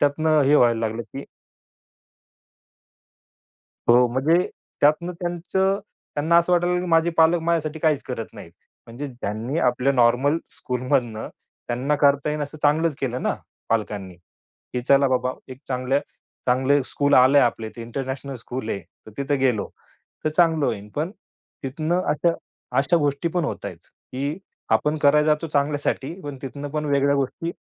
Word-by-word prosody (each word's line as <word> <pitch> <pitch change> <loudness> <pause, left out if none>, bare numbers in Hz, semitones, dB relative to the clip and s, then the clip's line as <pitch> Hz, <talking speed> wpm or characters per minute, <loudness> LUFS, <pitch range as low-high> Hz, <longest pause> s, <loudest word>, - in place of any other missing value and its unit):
त्यातनं 155 +2 +3
हे 140 +2 +4
व्हायला 120 -4 +4
लागलं, 115 +1 -2
की 135 +4 -9 2.6
हो. 120 +1 +6
म्हणजे 150 +9 +2 0.3
त्यातनं 155 +4 +3
त्यांचं 185 +3 0 0.4
त्यांना 160 +3 +3
असं 170 +1 +3
वाटायला 175 0 +3
लागलं 180 0 0
की - - -4
माझे 165 +1 +4
पालक 165 +2 +5
माझ्यासाठी 160 -2 0
काहीच 155 -3 +1
करत 120 -3 -5
नाहीत. 85 - -11 0.4
म्हणजे 120 +5 -6
ज्यांनी 120 +3 -4
आपल्या 125 -1 +2
नॉर्मल 130 +5 +3
स्कूलमधनं 125 -3 -2 0.4
त्यांना 125 +5 0
करता 145 0 +3
येईल 150 0 -2
असं 145 +2 -7
चांगलंच 155 +2 +3
केलं 125 -1 -2
ना, - - +1 0.3
पालकांनी, 105 -4 -2
की 90 +7 -10
चला 140 +2 +4
बाबा 125 0 0 0.2
एक 130 - -12
चांगल्या 130 +1 0 0.5
चांगले 130 +3 +3
स्कूल 145 +2 +1
आलंय. 130 +3 +6
आपल्या 115 -3 0
इथे 115 - -9
इंटरनॅशनल 130 +3 -5
स्कूल 120 0 -6
आहे, 100 - -2 0.3
तर - - -10
तिथे 140 +1 0
गेलो 130 -6 +1 0.6
तर - - +3
चांगलं 160 -2 +3
होईल. 100 +1 -3
पण 155 +4 -1 0.5
तिथनं 155 +6 -1
अशा 165 +3 +2 0.5
अशा 145 +6 +3
गोष्टी 145 +1 0
पण 175 0 -1
होतायेत, - - -5 0.3
की 140 +5 -3 0.3
आपण 150 +1 +2
करायला 150 +1 +4
जातो 155 +1 +2
चांगल्यासाठी, 145 0 -1
पण 145 -5 -7
तिथनं 140 +2 -6
पण 150 +1 -2
वेगळ्या 140 0 +3
गोष्टी 140 +5 -2
140 Hz, 150 wpm, -23 LUFS, 125-155 Hz, 2.6 s, हो